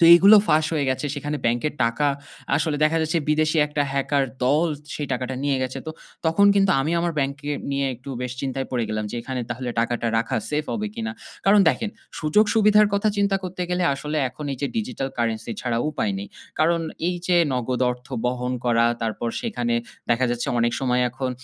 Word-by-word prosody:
তো 170 - +6
এগুলো 200 +5 +8
ফাঁস 155 0 +4
হয়ে 145 -3 0
গেছে। 130 +3 -1
সেখানে 145 +1 -3
ব্যাংকের 120 +6 0
টাকা 115 +6 +1 0.5
আসলে 155 -2 0
দেখা 160 +2 +2
যাচ্ছে 165 +2 0
বিদেশি 155 +1 +2
১ - - -16
টা 145 - +3
হ্যাকার 140 0 +1 0.2
দল 150 +6 +3 0.3
সেই 145 - -3
টাকাটা 125 +1 -2
নিয়ে 140 -2 +2
গেছে। 130 0 -3
তো - - -3 0.4
তখন 200 +5 +4
কিন্তু 195 -1 +4
আমি 155 +5 -1
আমার 170 0 0
ব্যাংককে 140 +1 -2 0.2
নিয়ে 140 0 0
একটু 125 +3 -13
বেশ 125 - -3
চিন্তায় 135 0 -3
পড়ে 120 -3 0
গেলাম 110 0 -2
যে, - - -4
এখানে 130 0 -4
তাহলে 120 +1 -3
টাকাটা 120 0 -1
রাখা 115 - -1
সেফ 150 +1 0
হবে 215 -1 -2
কি 230 - -5
না? 230 - -3 0.3
কারণ 205 +1 +7
দেখেন, 220 +5 0 0.3
সুযোগ-সুবিধার 210 +5 +4
কথা 200 +2 +2
চিন্তা 200 -1 +2
করতে 185 0 -4
গেলে 180 0 +1
আসলে 150 +2 -4
এখন 150 - -9
এই 130 - -6
যে, 140 - 0
digital 220 - -2
currency 115 0 -1
ছাড়া 120 -2 -1
উপায় 105 -9 -1
নেই। 100 - -6 0.3
কারণ 165 +2 +3 0.3
এই 180 - -1
যে 180 -1 +3 0.2
নগদ 125 0 -1
অর্থ 125 0 -7 0.2
বহন 125 0 -1
করা 115 -1 +3 0.2
তারপর 115 +1 -2
সেখানে 120 - -1 0.4
দেখা 125 +2 +3
যাচ্ছে 120 0 -2
অনেক 120 0 +2
সময় 125 -1 +1
এখন 130 0 -3
140 Hz, 200 wpm, -23 LUFS, 125-170 Hz, 0.5 s, এগুলো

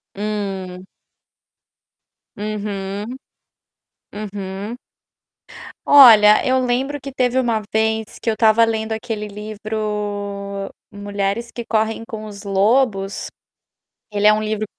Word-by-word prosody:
Hum. 195 -3 -4 1.5
Uhum. 205 +1 -4 1.0
Uhum. 205 +1 -6 1.1
Olha, 220 -7 +8
eu 260 0 +3
lembro 265 +4 -1
que 275 - -7
teve 255 -1 0
uma 230 -3 0
vez 220 0 0
que 235 - -4
eu - - 0
estava 220 +1 +5
lendo 220 0 -2
aquele 220 -1 -4
livro 205 -1 -4 0.2
Mulheres 205 +3 -3
que 235 - -6
correm 220 0 -1
com 215 -1 -7
os 200 -1 -9
lobos. 200 0 +1 0.8
Ele 210 0 +2
é 215 - +7
um 215 - 0
livro 215 0 -2
215 Hz, 105 wpm, -20 LUFS, 200-225 Hz, 1.5 s, Olha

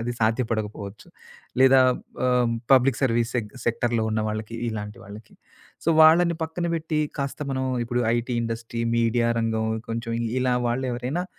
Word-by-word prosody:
అది 120 +1 -2
సాధ్యపడకపోవచ్చు. 110 -3 -2 0.5
లేదా 130 0 +7 0.5
ఆహ్, 125 -2 +2 0.2
పబ్లిక్ 130 -1 +4
సర్వీస్ 120 -2 +1
సె 120 - +1 0.2
సెక్టర్‌‌లో 115 -1 0
ఉన్న 110 0 0
వాళ్ళకి 110 +1 -5
ఇలాంటి 105 -2 -6
వాళ్ళకి. 105 +2 -12 0.5
సో, - - 0
వాళ్ళని 170 +2 +6
పక్కన 170 +2 -4
పెట్టి 160 -1 -2 0.2
కాస్త 140 +1 -3
మనం 130 0 -1 0.2
ఇప్పుడు 120 +1 -1 0.2
ఐటీ 120 +1 -2
ఇండస్ట్రీ, 115 0 -4 0.2
మీడియా 115 0 +2
రంగం 110 -1 -1 0.2
కొంచెం 115 0 -3 0.3
ఇలా 125 -1 +2
వాళ్ళెవరైనా 130 +6 -2
120 Hz, 135 wpm, -24 LUFS, 115-130 Hz, 0.5 s, లేదా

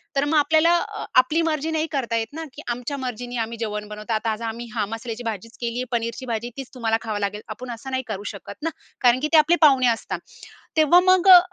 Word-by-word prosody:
तर 275 - +2
मग 305 +2 0
आपल्याला 315 +3 +4
अ, - - -4
आपली 300 +6 +4
मर्जी 320 -1 -1
नाही 315 0 0
करता 245 -5 -1
येत 225 - -1
ना, 325 +2 -5
की 300 - -9
आमच्या 245 +4 -3
मर्जीने 245 -2 -5
आम्ही 230 +1 -3
जेवण 210 -2 -3
बनवतो. 210 +2 -5
आता 220 +1 0
आज 215 - -4
आम्ही 230 +1 -4
हा 215 -3 +1
मसाल्याची 225 +1 -6
भाजीच 225 0 -5
केली 235 0 -2
आहे, - - 0
पनीरची 235 +2 -2
भाजी 235 -1 -3
तीच 270 -2 -6
तुम्हाला 225 -2 +1
खावं 215 -2 -3
लागेल. 205 +1 -2
आपण 245 +3 -6
असं 240 +3 -7
नाही 260 0 -1
करू 205 -2 -4
शकत 200 - -9
ना, 330 - +1 0.3
कारण 245 0 +5
की 305 - +1
ते 320 - +8
आपले 310 +3 +5
पाहुणे 270 -5 +6
असतात. 230 -1 -1 0.6
तेव्हा 315 +3 +6
मग 370 0 +4
अ, 365 -1 +12
245 Hz, 235 wpm, -23 LUFS, 225-290 Hz, 0.6 s, अ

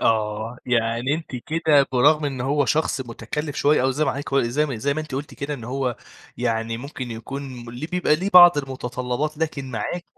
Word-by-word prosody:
آه. 110 +1 0
يعني 120 +3 +1
أنتِ 160 -5 -6
كده 150 +1 +2
برغم 150 +5 +4
إن 135 -3 -3
هو 145 +3 +1
شخص 155 -3 0
مُتكلّف 130 +5 -5
شوية 145 -2 +3
أو 130 - +2
زي 150 +4 0
ما 135 - +1
حضرتِك 140 +2 -5
قو 135 - +3
زي 135 +6 +1
ما 130 -5 -4
زي 140 +5 0
ما 155 - -2
أنتِ 155 -4 -7
قُلتِ 140 +3 -5
كده 145 +1 -4
إن 120 -5 -9
هو 130 -1 -2 0.4
يعني 115 0 -1
ممكن 130 -1 -6
يكون 130 +5 -6 0.2
م - - -8
ليه 125 +6 -6
بيبقى 175 -3 +2
ليه 190 +5 -2
بعض 175 -3 +9
المتطلّبات 130 +2 -3
لكن 140 -5 -3
معاكِ 125 +10 -3
135 Hz, 205 wpm, -23 LUFS, 120-150 Hz, 0.4 s, بعض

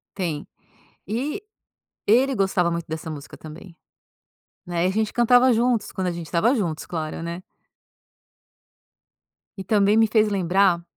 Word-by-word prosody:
Tem. 165 -6 -3 0.6
E 265 - -3 0.7
ele 255 +6 +4
gostava 190 -4 +1
muito 170 -1 -3
dessa 160 0 -5
música 150 -2 -9
também, 165 +3 -12 0.9
né, 175 -1 -1
e - - +2
a 190 - -1
gente 215 0 -1
cantava 245 +2 +5
juntos 235 0 +1
quando 190 -2 -2
a - - 0
gente 170 -1 -7
estava 180 - +2
juntos, 165 -7 -3
claro, 160 -1 -5
né? 170 +1 -5 2.2
E 190 - -7
também 205 +1 +3
me 225 0 +5
fez 215 0 +3
lembrar 190 -2 +2
190 Hz, 140 wpm, -23 LUFS, 170-220 Hz, 2.2 s, cantava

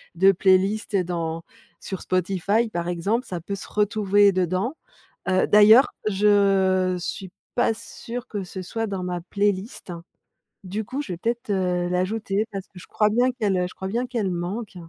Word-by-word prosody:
de 190 +3 +6
playlist 195 +3 +2
dans 165 -2 -2 0.4
sur 190 - -6
Spotify 195 +5 0
par 170 0 -3
exemple. 200 +9 -1
Ça 175 -2 -5
peut 200 +4 -4
se 195 - -9
retrouver 205 -1 +3
dedans, 185 - 0 0.5
heu, 185 0 +3
d'ailleurs, 215 +5 +7 0.2
je 195 -2 +3
suis 185 +1 -5 0.3
pas 240 -2 +2
sûre 240 +2 -8
que 205 -3 -4
ce 185 +1 -7
soit 225 +5 -3
dans 195 -3 -4
ma 180 -1 -3
playlist. 200 0 -2 0.7
Du 205 +4 -4
coup, 270 +7 -4
je 200 - -6
vais - - -7
peut-être, 235 +4 -3
heu, 180 -2 0
l'ajouter 195 +3 -1
parce 195 -1 -5
que 190 - -14
je 175 - -12
crois 210 - +2
bien 245 +3 +2
qu'elle, 205 -6 0
heu 180 - +1
je - - -14
crois 190 - -5
bien 240 +5 -1
qu'elle 225 -6 -2
manque. 185 +5 -4
195 Hz, 175 wpm, -24 LUFS, 185-215 Hz, 0.7 s, d'ailleurs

